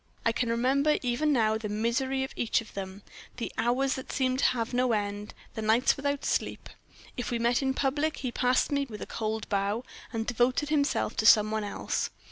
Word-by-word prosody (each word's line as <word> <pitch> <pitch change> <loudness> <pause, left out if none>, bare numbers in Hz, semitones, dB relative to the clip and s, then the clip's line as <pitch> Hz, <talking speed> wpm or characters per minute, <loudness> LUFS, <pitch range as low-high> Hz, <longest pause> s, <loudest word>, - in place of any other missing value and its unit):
I 230 - +4
can 240 0 -1
remember 270 +6 +2
even 255 +5 +1
now 220 -4 +2
the 215 -2 -4
misery 235 +5 0
of 265 - -6
each 230 - +1
of 225 - -10
them 195 0 -6 0.3
the 235 - -4
hours 250 +4 +1
that 260 - -6
seemed 260 -1 0
to - - +3
have 235 -1 0
no 250 -1 +2
end 205 0 -3 0.2
the 220 - -4
nights 220 +3 +3
without 285 0 -2
sleep. - - -1 0.5
If 245 - -3
we 240 - 0
met 235 +2 +2
in 265 -1 0
public, 290 +4 0
he 255 -3 -3
passed 250 +3 +2
me 280 -1 0
with 210 -2 -6
a - - -6
cold 220 -1 -3
bow, 200 +3 0 0.3
and 225 -1 -2
devoted 245 +5 +1
himself 295 -2 +1
to 220 - +3
some 215 -1 +7
one 220 -1 -1
else. 205 - -2
240 Hz, 205 wpm, -28 LUFS, 220-265 Hz, 0.5 s, some